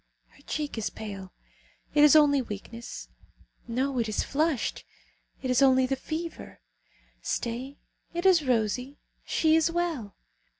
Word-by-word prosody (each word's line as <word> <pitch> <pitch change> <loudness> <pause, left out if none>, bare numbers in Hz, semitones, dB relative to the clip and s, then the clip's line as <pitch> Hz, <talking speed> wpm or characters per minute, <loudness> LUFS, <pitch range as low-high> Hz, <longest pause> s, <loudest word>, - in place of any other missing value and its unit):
Her - - -22
cheek 295 -6 -3
is 215 - -1
pale; 195 -3 -8 0.6
it 295 - +5
is 300 0 +8
only 290 -3 +6
weakness! 230 +1 -7 0.6
No, 255 +2 -1
it 225 -2 0
is 215 - 0
flushed; 300 -2 0 0.6
it 255 - 0
is 250 - +3
only 260 -1 +5
the 270 +1 0
fever. 320 +5 -6 0.6
Stay! 250 +4 -3 0.3
It 345 +2 -3
is 360 -5 +6
rosy. 250 +2 0 0.3
She 315 -1 +3
is 325 0 +3
well! 335 - -2
265 Hz, 135 wpm, -28 LUFS, 235-310 Hz, 0.6 s, is